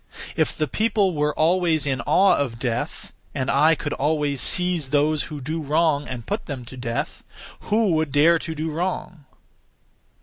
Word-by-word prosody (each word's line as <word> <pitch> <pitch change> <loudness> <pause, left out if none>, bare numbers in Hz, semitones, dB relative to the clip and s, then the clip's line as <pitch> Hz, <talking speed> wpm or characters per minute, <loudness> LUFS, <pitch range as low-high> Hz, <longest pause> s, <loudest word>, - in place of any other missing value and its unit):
If - - 0
the 155 - 0
people 210 - +1
were 150 -1 0
always 165 -2 +2
in 135 -2 -1
awe 195 +1 +5
of 125 -5 -2
death, 120 -1 -4 0.2
and 130 0 -1
I 155 +4 +4
could 145 - -4
always 145 -2 0
seize 180 -6 +2
those 150 +1 +1
who 150 -2 -7
do 155 +5 -4
wrong, 150 0 +1
and 120 -3 -6
put 205 +2 -4
them 130 -5 -6
to 125 - -10
death, 120 -2 -4 0.5
who 215 -2 +2
would 160 -3 0
dare 160 +4 +4
to 160 0 -5
do 160 +1 -3
wrong? 175 -2 -4
155 Hz, 170 wpm, -23 LUFS, 140-170 Hz, 0.5 s, awe